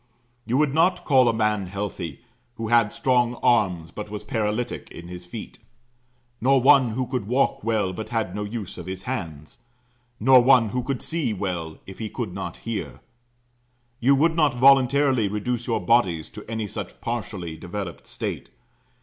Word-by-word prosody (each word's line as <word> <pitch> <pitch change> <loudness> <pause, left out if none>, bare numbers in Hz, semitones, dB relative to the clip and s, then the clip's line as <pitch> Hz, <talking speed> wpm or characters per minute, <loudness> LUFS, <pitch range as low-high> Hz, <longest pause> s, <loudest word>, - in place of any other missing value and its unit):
You 120 +3 +1
would 150 -2 +2
not 175 +3 +2
call 130 -4 +5
a - - +4
man 110 -3 0
healthy 95 -6 -5 0.3
who 115 -2 -4
had 115 -3 +4
strong 125 -2 +1
arms 95 -9 +2
but 105 0 -7
was 105 0 -6
paralytic 110 +1 -2
in 85 +1 -10
his 90 0 -9
feet; - - -8 0.8
nor 135 +3 +4
one 130 -3 +5
who 130 +2 -1
could 125 -5 -3
walk 130 0 +1
well, 110 -4 0
but 110 +4 -6
had 115 -2 -1
no 105 - -3
use 105 -3 -6
of 90 - -8
his 95 0 -5
hands; 85 - -6 0.6
nor 130 +3 +7
one 125 -3 +5
who 125 +4 -1
could 130 0 -3
see 160 -9 -1
well, 90 -5 -4
if 95 - -11
he 110 -2 -4
could 110 -7 -5
not 95 - -5
hear. 115 -2 -4 1.0
You 135 +4 +4
would 160 +4 +3
not 150 -6 +3
voluntarily 135 -2 +4
reduce 115 +4 -3
your 115 - +1
bodies 90 -6 +2
to 105 0 -11
any 110 -2 -3
such - - -7
partially 105 -8 -4
developed 90 +1 -7
state. - - -5
115 Hz, 170 wpm, -24 LUFS, 95-125 Hz, 1.0 s, nor